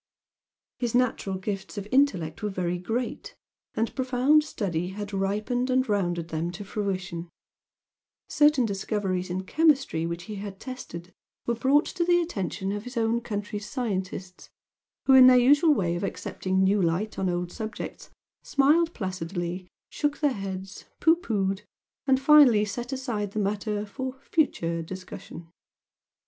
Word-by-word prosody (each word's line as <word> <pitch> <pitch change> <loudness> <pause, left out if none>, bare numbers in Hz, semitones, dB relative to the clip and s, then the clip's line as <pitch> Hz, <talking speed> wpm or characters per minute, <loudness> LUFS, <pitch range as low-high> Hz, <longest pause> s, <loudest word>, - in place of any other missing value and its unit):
His 240 -2 -1
natural 245 -6 +1
gifts 195 +2 -5
of 205 0 -4
intellect 195 - +2
were 210 - -1
very 180 -2 -2
great, 225 +7 -4 0.4
and 225 +1 -1
profound 260 +4 +3
study 180 - -2
had 200 +2 -6
ripened 210 +6 -1
and 255 +1 +2
rounded 175 -5 -1
them 160 +1 -2
to 200 +3 -7
fruition, 185 -4 -3 1.0
certain 295 -4 +4
discoveries 195 -2 -2
in 185 +2 -2
chemistry 270 - +2
which 170 +1 -4
he 210 +2 -7
had 195 -1 -7
tested 185 -9 -8 0.3
were 235 - +1
brought 270 +6 +3
to 345 - -2
the 350 0 +4
attention 195 - -3
of 205 0 -3
his 250 0 -7
own 230 +1 +1
country's 210 -1 -5
scientists, 190 -5 -4 0.6
who 265 - +5
in 260 -1 +10
their 255 0 +8
usual 290 +5 +5
way 175 -6 0
of 175 - -3
accepting 190 -1 -1
new 200 +1 +3
light 180 +5 -1
on 190 -1 +1
old 175 0 -2
subjects 220 +1 -6 0.3
smiled 315 +5 +3
placidly, 180 -2 -4 0.2
shook 295 -1 -1
their 290 -3 +2
heads, 195 -1 -6
pooh 325 0 +5
poohed, 200 - -1 0.5
and 265 -1 +4
finally 270 -7 +7
set 240 +5 -5
aside 230 -7 -3
the 215 - -1
matter 210 +1 -1
"for 260 +5 -6
future 170 - 0
discussion." 175 -1 -9
210 Hz, 145 wpm, -27 LUFS, 185-255 Hz, 1.0 s, in